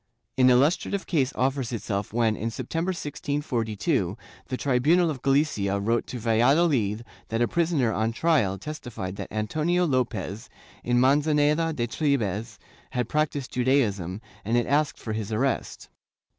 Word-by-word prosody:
An 130 -1 +5
illustrative 150 +10 +2
case 140 -6 +1
offers 130 -1 0
itself 100 -3 -3
when, 115 -1 +2
in 115 +2 -3
September, 165 - -3
1642, 130 - -2 0.3
the 130 - -3
tribunal 150 +7 +3
of 135 -4 -7
Galicia 135 -9 +1
wrote 115 +3 0
to 125 - -5
Valladolid 120 -1 +2 0.2
that 115 - -2
a - - +2
prisoner 160 -9 +1
on 110 +1 0
trial 120 - +1
testified 120 -7 -6
that - - -6
Antonio 155 +12 0
Lopez, 125 - -2 0.3
in 120 0 +2
Manzaneda 150 +4 +3
de 120 -6 -1
Tribes, 115 - -1 0.3
had 125 -3 -2
practised 150 -3 -1
Judaism, 110 -8 +1 0.2
and 115 +4 +1
it 120 - +2
asked 145 +2 +1
for 110 - -5
his 110 -1 -4
arrest. 130 +5 -1
125 Hz, 140 wpm, -26 LUFS, 110-150 Hz, 0.3 s, An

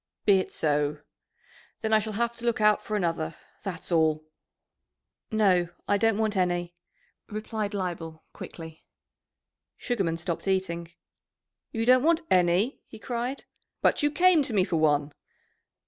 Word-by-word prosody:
"Be 200 -2 +6
it 185 - -4
so! 150 -1 0 0.8
Then 220 0 0
I 215 - +6
shall 215 0 -5
have 235 +2 -1
to 235 - -7
look 235 - +1
out 210 0 +4
for 215 - -2
another, 165 -4 -1 0.3
that's 180 -3 -6
all." 160 -2 +2 1.1
"No, 190 -5 +3 0.2
I 205 - +2
don't 225 -1 +2
want 215 -1 0
any," 175 -2 0 0.6
replied 215 -1 -4
Leibel 165 -4 -4
quickly. 160 -1 -10 0.9
Sugarman 195 -10 -1
stopped 170 +2 -4
eating. 170 -3 -1 0.8
"You 225 0 -1
don't 255 +1 +6
want 330 +3 +3
any?" 180 +7 +2
he 220 - -11
cried. 245 +3 -4 0.4
"But - - +3
you 295 - +3
came 355 +1 +4
to 260 -4 -3
me 195 -3 +4
for 170 - -1
one?" 150 -2 +2
195 Hz, 145 wpm, -27 LUFS, 170-225 Hz, 1.1 s, Be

